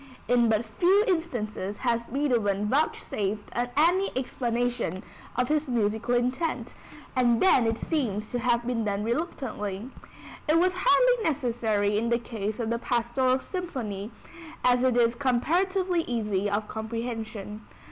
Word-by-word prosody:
In 240 -2 +4
but 220 +1 +1
few 360 - +3
instances 225 - -2
has 235 -2 0
Beethoven 230 -7 0
vouchsafed 210 -6 -1 0.3
any 355 +6 +4
explanation 240 -6 -1 0.3
of 250 +1 +1
his 305 +1 0
musical 230 0 0
intent, 255 +7 -1 0.4
and 240 -2 +3
then 260 -11 +5
it 225 0 0
seems 220 - -2
to 245 - -2
have 240 -1 +1
been 240 -2 -1
done 205 -1 -1
reluctantly. 230 - -3 0.6
It 310 +2 +4
was 365 +2 +3
hardly 475 +6 +4
necessary 225 - +1
in 230 +1 -1
the 235 - +3
case 220 -3 -4
of 230 -1 -1
the 235 - 0
Pastoral 245 +2 +1
Symphony 240 - -4 0.6
as 250 0 +4
it 255 -2 +3
is 235 -1 +4
comparatively 345 +9 +1
easy 210 -4 -1
of 205 +1 -1
comprehension. 220 -2 -5
240 Hz, 135 wpm, -27 LUFS, 215-275 Hz, 0.6 s, then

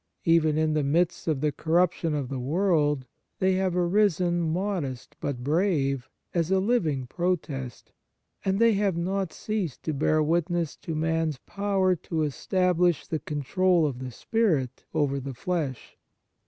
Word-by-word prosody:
Even 160 -2 +4
in 155 0 +2
the 155 - +2
midst 165 +6 +1
of 150 -4 0
the 150 -1 +2
corruption 165 +1 +1
of 140 -3 -2
the 130 0 -4
world 150 -1 +1 0.3
they 190 0 +2
have 185 -1 0
arisen, 175 -2 +2
modest, 165 -6 -2
but 130 -4 -3
brave, 145 -5 +1 0.2
as 170 -1 0
a 190 0 +3
living 175 - +1
protest, 145 -5 -3 0.5
and 190 0 +1
they 230 +1 +5
have 195 -3 +1
not 190 +1 -1
ceased 205 - -3
to 155 - -2
bear 155 +2 +2
witness 170 0 0
to 165 - -6
man's 160 -1 0
power 195 -2 +1
to 160 -1 -2
establish 180 +3 +1
the 160 - -2
control 170 +4 +1
of 135 -4 -2
the 130 0 -5
spirit 145 - 0
over 145 -3 0
the 135 -1 -6
flesh. 150 -3 -3
165 Hz, 150 wpm, -27 LUFS, 145-185 Hz, 0.5 s, they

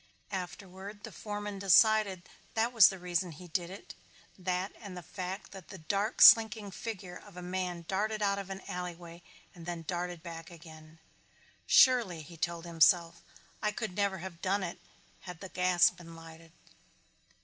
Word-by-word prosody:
Afterward, 190 +2 -7
the - - -8
foreman 205 -1 -6
decided 200 -1 +4 0.3
that 230 +2 +1
was 225 -5 +9
the 190 - -6
reason 180 -1 -2
he 180 +4 -12
did 170 +1 -2
it, 195 +2 -10 0.4
that 185 +1 -2
and 200 -4 -9
the 180 - -8
fact 185 +4 -6
that 190 -4 -11
the 190 - -9
dark 200 +7 +1
slinking 220 -2 +7
figure 190 -4 -6
of 200 -4 -16
a 180 - -7
man 180 -1 -3
darted 215 +3 -1
out 200 -1 +1
of 195 -1 -7
an 195 0 -6
alleyway 175 -1 -7 0.3
and 170 -2 -12
then 170 -1 -4
darted 175 0 -4
back 165 -1 -8
again. 160 -1 -14 0.7
"Surely," 230 -11 +5
he 170 +3 -12
told 170 +1 -3
himself, 170 0 +3 0.4
"I 210 - +1
could 210 -4 -5
never 200 -1 0
have 170 -1 -9
done 195 +1 0
it 175 0 -5 0.4
had 180 -3 -10
the 190 - -8
gas 180 -1 +4
been 175 -2 -13
lighted." 165 0 -13
180 Hz, 165 wpm, -31 LUFS, 170-200 Hz, 0.7 s, was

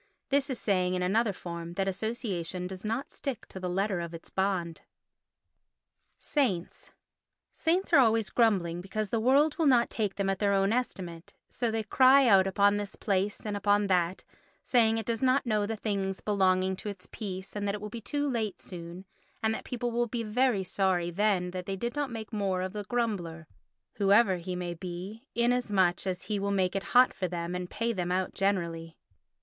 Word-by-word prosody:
This 275 0 +2
is 260 - -2
saying 185 -4 +1
in 180 - -1
another 215 +4 +2
form 170 -2 -7
that 195 +1 0
association 190 -4 -3
does 185 0 -7
not 225 +5 -3
stick 270 -5 -5
to 190 - -8
the 180 -1 -3
letter 195 +1 0
of 170 0 -5
its 165 - -12
bond. 185 -4 -1 1.4
Saints 210 - -2 0.6
Saints 355 +3 0
are 295 - +8
always 225 -6 +3
grumbling 185 -7 +2
because 205 +2 -4
the 230 - +1
world 280 +7 +3
will 320 - +3
not 245 -3 +4
take 210 -3 -1
them 200 -1 -1
at 195 -1 0
their 200 -1 +2
own 195 +2 +2
estimate; 180 -9 -4 0.2
so 240 -2 -1
they 220 0 -1
cry 260 +5 +6
out 195 -3 +6
upon 200 +1 +3
this 205 -1 -5
place 200 0 -1
and 210 -1 -2
upon 205 0 +2
that, 180 -1 +1 0.4
saying 225 -3 +3
it 225 - -3
does 230 0 -2
not 265 +1 +3
know 210 -3 +1
the 225 - -2
things 200 -3 -2
belonging 190 -2 +2
to 210 - -5
its 200 -3 -9
peace 190 -2 -6
and 205 0 -2
that 200 - 0
it - - -6
will 210 - -5
be 235 - -6
too 290 +8 -1
late 220 -7 -2
soon 175 +1 -9 0.4
and 220 0 +2
that - - -5
people 245 -1 -3
will 240 +1 0
be 235 0 -3
very 225 -1 +1
sorry 185 -2 0
then 185 -1 +1
that 180 -1 -6
they 195 - -2
did 235 +7 -4
not 290 -2 -1
make 225 -1 -7
more 195 -3 0
of 185 - -4
the 210 -1 -5
grumbler, 190 -8 -2 0.5
whoever 200 -1 +4
he 180 +1 -5
may 175 -1 -3
be, 185 - -7
inasmuch 210 -7 +2
as 180 -1 -2
he 210 -2 -2
will 200 +1 -1
make 190 -2 +1
it 195 - -2
hot 250 +1 +7
for 185 - -2
them 170 0 -4
and 180 0 -4
pay 230 +1 -1
them 180 -3 -2
out 185 0 0
generally. 170 -4 -1
200 Hz, 200 wpm, -29 LUFS, 185-225 Hz, 1.4 s, are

